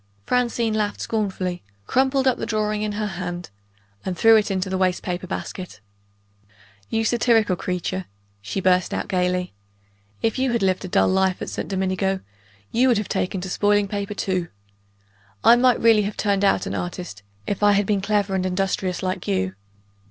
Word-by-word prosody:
Francine 240 -2 +1
laughed 210 -1 -1
scornfully 190 -5 -2 0.2
crumpled 265 - +2
the 260 -2 +1
drawing 215 -1 0
up 215 - 0
in - - -2
her 210 +1 -2
hand 175 - -5 0.5
and 185 -2 -3
threw 225 +6 +7
it 215 -1 +3
into 190 -1 -1
the 190 0 -1
waste 185 -1 +1
paper 180 0 -3
basket. 180 - -6 1.1
"You 225 0 0
satirical 225 -4 +3
creature!" 180 +1 -3 0.4
she 100 - -3
burst 185 -1 +2
out - - -3
gayly. 180 -1 0 0.7
"If 225 +3 +1
you 260 -2 +1
had 235 - +1
lived 185 0 +1
a - - -4
dull - - +3
life 190 -1 +2
at - - -5
St. - - -4
Domingo, 190 0 -1 0.5
you 250 +3 +3
would 245 -4 +4
have 210 - -3
taken 185 0 -1
to 185 - -5
spoiling 205 +1 +2
paper 200 +1 -4
too. 185 -3 -1 1.0
I 235 - +8
might 250 0 +4
really 225 -2 +5
have 205 0 -3
turned 200 -2 +1
out 195 -2 +3
an - - -4
artist, 175 - -5 0.2
if 205 - -3
I 205 0 +5
had 200 0 +2
been 200 -1 +1
clever 205 -1 0
and 190 -1 0
industrious 185 0 -1
like 185 0 -3
you. 95 -1 0
195 Hz, 180 wpm, -23 LUFS, 185-215 Hz, 1.1 s, I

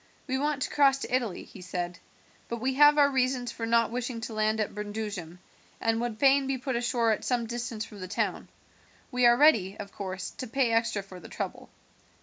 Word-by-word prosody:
"We 265 -1 -1
want 290 -1 0
to - - -2
cross 275 -2 +4
to 255 - -2
Italy," 235 -7 -2
he - - -13
said, 175 -1 -4 0.5
"but 235 - -3
we 260 +3 0
have 295 +2 +6
our 285 -1 +5
reasons 255 -2 0
for 230 - -4
not 230 0 +3
wishing 245 -1 -3
to 225 - -5
land 215 0 +1
at 215 - -1
Brundusium, 205 -5 -5 0.4
and 225 0 +1
would 240 -2 -3
fain 275 +2 +4
be 270 -1 0
put 260 0 -3
ashore 235 -1 +1
at 215 - -1
some 245 -2 0
distance 235 -1 -4
from 210 - -12
the 185 - -6
town. - - -2 0.6
We 250 -1 +4
are 240 0 +6
ready, 225 -10 +4
of 200 -1 -8
course, 190 -2 -5
to 255 - -4
pay 245 0 +1
extra 230 -3 +1
for 190 -2 -11
the 170 - -12
trouble." - - -5
235 Hz, 210 wpm, -28 LUFS, 215-260 Hz, 0.6 s, have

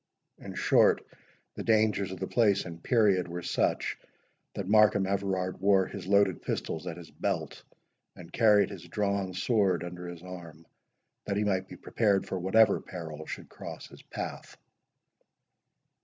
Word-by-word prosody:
In - - -9
short, - - +3 0.5
the - - -6
dangers 110 -3 +2
of 95 - -7
the 95 - -2
place 100 -2 +2
and 85 -1 -8
period 100 -6 +3
were 85 0 -6
such, - - 0 0.6
that 95 - -4
Markham 105 -1 +5
Everard 95 -2 -1
wore 95 -1 +4
his 95 -2 -8
loaded 100 -3 +3
pistols 80 - -4
at 85 - -5
his 85 -2 -11
belt, - - -3 0.5
and 85 -2 -13
carried 105 -3 +4
his 85 -4 -9
drawn 100 -1 -1
sword 95 -4 +1
under 90 0 -7
his 85 -1 -9
arm, 85 -3 -10 0.6
that 100 - -1
he 105 - +1
might 95 -2 0
be - - -10
prepared 100 -4 +1
for 95 - -3
whatever 100 +4 +4
peril 80 -4 -8
should - - -7
cross - - -9
his - - -14
path. - - -7
95 Hz, 155 wpm, -29 LUFS, 90-100 Hz, 0.6 s, Markham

